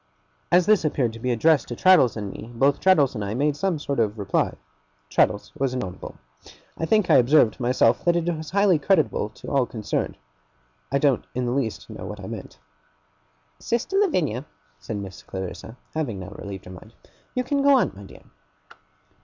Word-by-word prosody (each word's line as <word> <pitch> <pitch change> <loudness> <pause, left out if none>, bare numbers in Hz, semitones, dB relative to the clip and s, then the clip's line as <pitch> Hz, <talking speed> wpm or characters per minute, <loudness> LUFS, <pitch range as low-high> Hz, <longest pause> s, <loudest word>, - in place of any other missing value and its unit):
As 180 0 +5
this 215 -2 +4
appeared 135 -6 0
to 115 - -9
be 125 - -2
addressed 145 +4 +3
to 120 - -5
Traddles 155 - +5
and 100 -2 -4
me, 115 - -10
both 140 +4 +2
Traddles 155 -8 +4
and 105 -4 -4
I 100 +2 -3
made 145 +3 +1
some 180 +2 -1
sort 140 -3 -3
of 110 -1 0
reply. 100 -1 0 0.6
Traddles - - +1
was 135 -2 -1
inaudible. 95 -8 -6 0.6
I 165 - -3
think 215 -1 +3
I - - +8
observed, 125 -3 +4
myself, 120 -1 +2
that 175 0 +3
it 170 -1 0
was 155 -1 -7
highly 200 -4 +3
creditable 145 - +1
to 110 - -11
all 135 -3 +2
concerned. 110 -3 -3 0.7
I 140 - +2
don't 140 -3 +2
in 125 0 -1
the 120 - -1
least 125 -4 -2
know - - -8
what - - -7
I - - -8
meant. - - -8 1.0
'Sister 235 +11 -2
Lavinia,' 155 - 0 0.3
said 105 +7 -5
Miss 95 -2 -8
Clarissa, 95 +5 -7 0.2
having 145 -10 -2
now 90 - -7
relieved 100 -2 -8
her 90 - -10
mind, 110 +5 -13 0.4
'you 250 - 0
can 280 +2 0
go 280 -1 +6
on, - - +1
my 100 - -12
dear. 95 - -14
130 Hz, 185 wpm, -24 LUFS, 110-165 Hz, 1.0 s, I